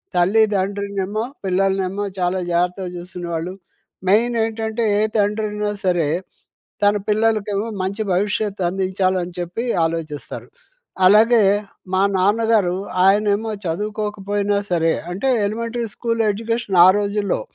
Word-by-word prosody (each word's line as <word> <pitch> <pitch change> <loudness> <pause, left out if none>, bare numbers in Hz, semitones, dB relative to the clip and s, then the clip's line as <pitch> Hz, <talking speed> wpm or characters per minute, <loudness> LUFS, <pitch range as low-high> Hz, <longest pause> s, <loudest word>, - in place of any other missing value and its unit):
తల్లిదండ్రినేమో, 200 +1 +1 0.2
పిల్లలనేమో 190 +1 0 0.2
చాలా 180 +1 0
జాగ్రత్తగా 180 +2 0
చూసుకునేవాళ్ళు. 175 0 -5 0.6
మెయినేంటంటే, 225 0 +1 0.2
ఏ - - +2 0.2
తండ్రయినా 210 0 0
సరే, 175 -4 +2 0.8
తన 205 +1 +4
పిల్లలకేమో 215 -1 +1 0.2
మంచి 200 +3 -2
భవిష్యత్తు 205 +1 -1
అందించాలని 185 -1 -1
చెప్పి 175 +8 -4 0.2
ఆలోచిస్తారు. 160 -3 -5 0.6
అలాగే, 220 +3 +6 0.5
మా 190 - +3 0.2
నాన్నగారు, 205 -2 +2 0.3
ఆయనేమో 205 +2 +2 0.2
చదువుకోకపోయినా 205 +2 -2 0.2
సరే, 165 -1 +2 0.2
అంటే 230 +9 -2 0.2
ఎలిమెంటరీ 230 +2 -3
స్కూల్ 230 -1 0
ఎడ్యుకేషన్ 225 -3 -2
ఆ - - +8
రోజుల్లో. 205 - -1
200 Hz, 95 wpm, -20 LUFS, 185-215 Hz, 0.8 s, ఆ